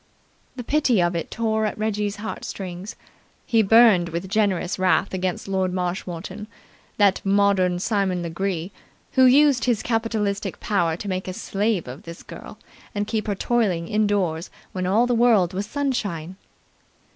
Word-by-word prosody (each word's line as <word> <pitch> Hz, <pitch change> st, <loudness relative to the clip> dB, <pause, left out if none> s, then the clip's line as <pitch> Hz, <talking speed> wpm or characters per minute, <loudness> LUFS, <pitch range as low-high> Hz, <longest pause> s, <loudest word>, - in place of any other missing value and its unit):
The 250 Hz, -, -6 dB
pity 260 Hz, -5 st, +2 dB
of 175 Hz, 0 st, +1 dB
it 165 Hz, -, -3 dB
tore 220 Hz, -1 st, 0 dB
at -, -, -5 dB
Reggie's 210 Hz, -1 st, -1 dB
heart 215 Hz, +1 st, -6 dB
strings. 185 Hz, +1 st, -6 dB, 0.5 s
He 225 Hz, -1 st, +3 dB
burned 215 Hz, -5 st, +5 dB
with 170 Hz, +3 st, -4 dB
generous 200 Hz, -2 st, 0 dB
wrath 185 Hz, +1 st, +2 dB
against 185 Hz, 0 st, -2 dB
Lord 190 Hz, -1 st, 0 dB
Marshmoreton, 185 Hz, +2 st, -4 dB, 0.5 s
that 200 Hz, -2 st, +3 dB
modern 195 Hz, -2 st, +2 dB
Simon 190 Hz, -2 st, 0 dB
Legree, 170 Hz, +1 st, -3 dB, 0.4 s
who 260 Hz, -1 st, +5 dB
used 275 Hz, -1 st, +5 dB
his 240 Hz, -4 st, +1 dB
capitalistic 220 Hz, -3 st, -1 dB
power 170 Hz, -6 st, 0 dB
to 205 Hz, -, -7 dB
make 185 Hz, -1 st, -3 dB
a 185 Hz, -, -4 dB
slave 200 Hz, -, -1 dB
of 130 Hz, +5 st, -8 dB
this 170 Hz, 0 st, -10 dB
girl -, -, -11 dB, 0.4 s
and 205 Hz, 0 st, 0 dB
keep 215 Hz, 0 st, -2 dB
her 205 Hz, -, 0 dB
toiling 195 Hz, -7 st, 0 dB
indoors 205 Hz, -6 st, 0 dB, 0.2 s
when 185 Hz, -1 st, -3 dB
all 215 Hz, +6 st, +3 dB
the 245 Hz, -, 0 dB
world 225 Hz, -7 st, +3 dB
was 195 Hz, +2 st, -3 dB
sunshine. 205 Hz, -, -2 dB
200 Hz, 155 wpm, -23 LUFS, 180-220 Hz, 0.5 s, burned